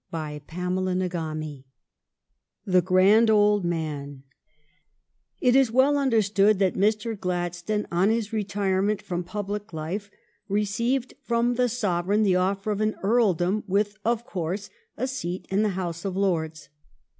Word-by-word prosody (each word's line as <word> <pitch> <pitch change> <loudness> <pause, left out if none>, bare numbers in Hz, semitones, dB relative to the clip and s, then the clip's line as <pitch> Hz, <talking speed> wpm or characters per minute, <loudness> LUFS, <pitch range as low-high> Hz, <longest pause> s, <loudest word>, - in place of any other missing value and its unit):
CHAPTER 150 -1 -6
XXXIV 180 -5 -2 0.5
" - - -55
THE 185 -2 +4
GRAND 195 +5 +5
OLD 210 -2 +4
MAN 150 -5 -4 0.6
" - - -51 0.5
It 250 -1 +3
is 265 -4 +4
well 260 +4 +4
understood 215 -6 +3
that 190 -1 +2
Mr. 215 +3 +1
Gladstone 180 +2 -2
on 180 +4 +3
his 225 -1 -1
retirement 200 -1 0
from 175 0 -3
public 205 +2 -5
life 175 +7 -4 0.4
received 230 +6 0
from 235 +1 +1
the 250 0 +1
Sov 185 -7 -1
ereign 210 +2 +3
the 190 -3 +3
offer 195 +3 0
of 210 0 -2
an 215 0 +1
earldom 200 -3 +2
with, 205 +2 0
of 235 0 0
course, 190 -1 -4 0.3
a 250 - -1
seat 220 -9 -4
in 195 +2 +2
the 215 - +2
House 170 -2 -4
of 190 -2 -3
Lords. 165 -5 -1
195 Hz, 145 wpm, -25 LUFS, 175-215 Hz, 0.6 s, GRAND